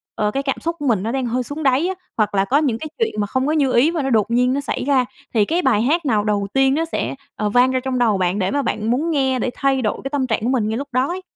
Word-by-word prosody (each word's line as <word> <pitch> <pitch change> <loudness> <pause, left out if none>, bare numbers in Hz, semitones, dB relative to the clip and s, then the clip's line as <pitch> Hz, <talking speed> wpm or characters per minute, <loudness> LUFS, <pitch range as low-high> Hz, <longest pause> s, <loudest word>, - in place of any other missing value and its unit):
ờ, 210 0 0
cái 275 +5 -2
cảm 270 -1 -2
xúc 335 +1 -3
của 290 - -4
mình 215 -6 +1
nó 225 - -2
đang 265 0 -1
hơi 245 +2 -1
xuống 290 +5 -6
đáy 275 +5 +3
á, 380 - -2 0.2
hoặc 215 -2 +1
là 195 0 +2
có 265 +7 +2
những 275 -7 +1
cái 315 - -5
chuyện 455 - -1
mà 205 - 0
không 260 +5 -1
có - - +1
như 280 -5 +2
ý 265 +7 +4
và 335 -3 -1
nó 270 - -1
đột 225 -2 +1
nhiên 250 +2 +2
nó 280 - -1
xảy - - -3
ra, 265 -2 +2 0.3
thì 215 -3 +3
cái 335 - 0
bài 245 -9 +2
hát 310 +7 +1
nào 215 -6 +2
đầu 205 -1 0
tiên 270 0 +3
nó 325 +2 0
sẽ, 325 - -3 0.2
ờ, 210 - -1
vang 245 +4 +4
ra 260 - +1
trong 255 -1 -2
đầu 225 -5 +3
bạn 185 +2 0
để 190 0 0
mà 285 - +1
bạn 225 -3 -1
muốn 300 +7 0
nghe 265 -4 +1
để - - -1
thay 270 -1 +1
đổi 215 - -1
cái 270 - -3
tâm 275 -2 -1
trạng 225 - 0
của 235 - 0
mình 245 -5 +1
ngay 220 - -2
lúc 280 +2 -5
đó 255 +2 +2
ấy? 360 +3 -4
260 Hz, 330 wpm, -20 LUFS, 225-280 Hz, 0.3 s, ý